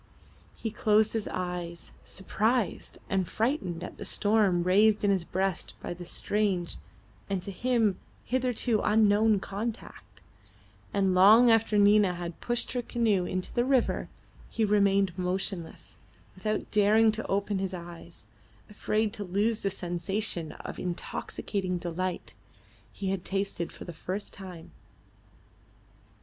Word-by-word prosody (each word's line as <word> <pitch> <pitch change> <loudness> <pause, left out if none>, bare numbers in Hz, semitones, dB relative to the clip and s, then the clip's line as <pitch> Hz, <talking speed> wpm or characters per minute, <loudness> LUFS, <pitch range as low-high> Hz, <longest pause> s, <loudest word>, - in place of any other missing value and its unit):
He 225 - -4
closed 215 0 +3
his 225 -2 -2
eyes, 175 -2 -5
surprised 215 +4 -1
and 190 -2 0
frightened 215 - -1
at - - -8
the - - -5
storm 205 -3 +2
raised 205 +4 +4
in 205 - +4
his 190 -3 +1
breast 190 +1 -2
by - - -5
the 175 0 -9
strange 190 -1 -1 0.5
and 195 -2 -1
to 200 - -5
him 225 -1 +1 0.3
hitherto 250 -3 +1
unknown 210 0 +4
contact, 210 +4 -6 0.7
and 195 -2 +2
long 215 +6 +7
after 225 -1 +3
Nina 205 -2 +5
had 170 -1 -6
pushed 240 0 -2
her 250 - -1
canoe 220 -6 +1
into 185 +1 -3
the 240 - +2
river 260 -1 +1 0.4
he 225 - 0
remained 200 -3 +3
motionless, 180 -1 -4 0.3
without 215 -1 -3
daring 215 +2 +5
to 220 +1 -4
open 200 0 0
his 190 -1 -2
eyes, 170 -1 -11 0.5
afraid 215 +1 0
to 205 - -4
lose 205 +4 0
the 195 - 0
sensation 180 -1 -2
of - - -8
intoxicating 185 +1 -3
delight 175 +1 -4 0.6
he 195 - -4
had 190 -2 -2
tasted 195 -3 -2
for - - -10
the 175 - -7
first 185 +5 -4
time. 180 -4 -10
200 Hz, 135 wpm, -28 LUFS, 180-215 Hz, 0.7 s, long